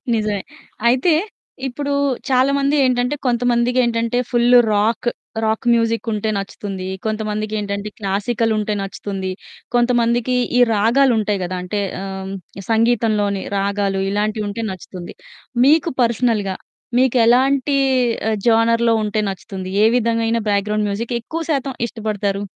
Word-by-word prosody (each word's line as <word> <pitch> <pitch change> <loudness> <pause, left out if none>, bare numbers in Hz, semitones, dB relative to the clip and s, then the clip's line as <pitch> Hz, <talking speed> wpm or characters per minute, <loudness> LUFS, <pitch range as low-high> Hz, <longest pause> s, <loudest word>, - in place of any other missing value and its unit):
నిజమే. 210 -2 -1 0.5
అయితే 260 +8 +3 0.5
ఇప్పుడు 285 +3 -3 0.4
చాలామంది 275 +3 +2
ఏంటంటే 250 +2 +1
కొంతమందికేంటంటే 240 -1 +1
ఫుల్ 240 0 +4 0.2
రాక్, 215 +4 +1 0.4
రాక్ 220 +2 -1
మ్యూజిక్ 230 0 0
ఉంటే 215 +1 -1
నచ్చుతుంది. 195 -1 -5 0.2
కొంతమందికేంటంటే 210 -1 -2
క్లాసికల్ 215 +3 0
ఉంటే 210 0 -1
నచ్చుతుంది, 195 -1 -5 0.4
కొంతమందికి 240 0 +2 0.2
ఈ - - +5
రాగాలు 240 +5 +3
ఉంటాయి 205 -2 -1
గదా! 185 +1 -4
అంటే 205 +3 -3 0.2
ఆహ్, 190 0 -6 0.4
సంగీతంలోని 220 -3 +1 0.2
రాగాలు 200 -1 0
ఇలాంటివి 210 +1 -1
ఉంటే 225 +3 -4
నచ్చుతుంది. 185 -1 -8 0.5
మీకు 315 +3 +4
పర్సనల్‌గా 225 -5 +1 0.4
మీకెలాంటి 260 +3 +3 0.5
ఆహ్, 220 - 0
జోనర్‌లో 230 0 +3
ఉంటే 210 +1 -1
నచ్చుతుంది 190 0 -7
ఏ - - +7
విధమైన 230 -1 +1
బ్యాక్ 200 0 +1
గ్రౌండ్ 210 0 0
మ్యూజిక్ 230 +4 -3
ఎక్కువ 325 +8 -5
శాతం 270 -2 -2
ఇష్టపడతారు? 210 -3 -3
225 Hz, 115 wpm, -19 LUFS, 205-245 Hz, 0.5 s, ఏ